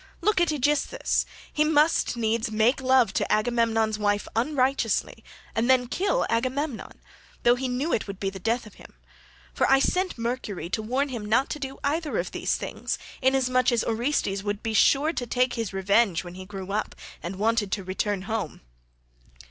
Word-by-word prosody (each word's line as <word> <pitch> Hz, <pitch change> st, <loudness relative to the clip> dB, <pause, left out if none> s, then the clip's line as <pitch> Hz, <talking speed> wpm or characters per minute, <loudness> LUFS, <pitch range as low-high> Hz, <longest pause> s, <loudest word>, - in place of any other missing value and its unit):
Look 395 Hz, +1 st, +2 dB
at 345 Hz, -, +3 dB
Aegisthus; 295 Hz, -, 0 dB, 0.3 s
he 300 Hz, -, +3 dB
must 305 Hz, -4 st, +2 dB
needs 225 Hz, 0 st, 0 dB
make 220 Hz, +5 st, +2 dB
love 260 Hz, -2 st, +4 dB
to -, -, -1 dB
Agamemnon's 225 Hz, -1 st, +1 dB
wife 205 Hz, 0 st, 0 dB
unrighteously 265 Hz, +2 st, 0 dB, 0.3 s
and 230 Hz, +3 st, 0 dB
then 255 Hz, -1 st, +5 dB
kill 395 Hz, -, 0 dB
Agamemnon, 260 Hz, +2 st, -2 dB, 0.4 s
though 240 Hz, -, +6 dB
he 260 Hz, +1 st, -2 dB
knew 260 Hz, +6 st, -1 dB
it 215 Hz, -, 0 dB
would 200 Hz, -1 st, -7 dB
be 195 Hz, -1 st, -1 dB
the 190 Hz, -, -8 dB
death 230 Hz, +5 st, -1 dB
of 215 Hz, -, -13 dB
him; -, -, -16 dB, 0.6 s
for -, -, +1 dB
I 270 Hz, -, +7 dB
sent 365 Hz, +6 st, 0 dB
Mercury 230 Hz, -7 st, -4 dB
to 220 Hz, -, 0 dB
warn 260 Hz, +6 st, -1 dB
him 240 Hz, -5 st, -5 dB
not 225 Hz, +6 st, +2 dB
to 300 Hz, -, -4 dB
do 270 Hz, -1 st, -5 dB
either 305 Hz, +2 st, -1 dB
of -, -, -2 dB
these -, -, -1 dB
things, -, -, -4 dB, 0.2 s
inasmuch 255 Hz, -1 st, +3 dB
as 235 Hz, -2 st, +1 dB
Orestes 225 Hz, -4 st, 0 dB
would 205 Hz, +1 st, -3 dB
be 225 Hz, -1 st, -2 dB
sure 285 Hz, +8 st, +4 dB
to 245 Hz, -, -3 dB
take 250 Hz, +2 st, +1 dB
his 225 Hz, -5 st, -3 dB
revenge 195 Hz, -1 st, +2 dB
when 175 Hz, -1 st, -9 dB
he 185 Hz, +1 st, -9 dB
grew 195 Hz, -1 st, -7 dB
up 210 Hz, +1 st, -2 dB, 0.3 s
and 175 Hz, +3 st, -5 dB
wanted 215 Hz, 0 st, +1 dB
to 200 Hz, -, -2 dB
return 190 Hz, +1 st, -2 dB
home. 215 Hz, -6 st, -4 dB
235 Hz, 180 wpm, -26 LUFS, 210-270 Hz, 0.6 s, I